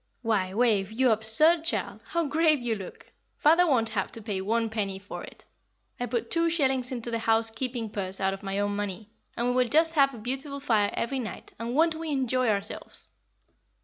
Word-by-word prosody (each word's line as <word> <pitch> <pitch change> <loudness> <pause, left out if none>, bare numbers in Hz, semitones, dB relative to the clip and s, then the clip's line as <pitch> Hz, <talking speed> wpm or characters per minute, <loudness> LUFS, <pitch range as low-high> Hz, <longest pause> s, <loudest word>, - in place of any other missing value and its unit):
Why, 205 -5 0
Wave, 210 -2 +1
you 250 +2 +2
absurd 225 +10 +7
child, 330 - -2
how 335 -1 -1
grave 310 +1 +2
you 240 -2 -2
look! 195 -4 -9 0.3
Father 335 +4 +4
won't 235 -7 +1
have 200 -4 -3
to 225 - -5
pay 205 -3 -3
one 225 +4 0
penny 205 -3 -3
for 200 +1 -9
it. - - -13 0.5
I 245 - -2
put 240 -1 -3
two 335 0 +1
shillings 265 -5 0
into 240 -2 -5
the 230 - -2
housekeeping 225 +2 0
purse 190 -2 -4
out 190 -1 0
of 195 - -8
my 195 -1 -4
own 205 0 -1
money, 205 +1 -5 0.3
and 235 - -1
we - - 0
will 250 0 +2
just 320 +5 +3
have 275 -4 +3
a - - -10
beautiful 270 +5 -5
fire 215 -7 +1
every 265 +3 -2
night; 225 -3 -8
and 235 +2 -4
won't 325 +2 +3
we 320 0 -6
enjoy 255 -3 0
ourselves!" 205 +1 -3
235 Hz, 200 wpm, -27 LUFS, 210-275 Hz, 0.5 s, absurd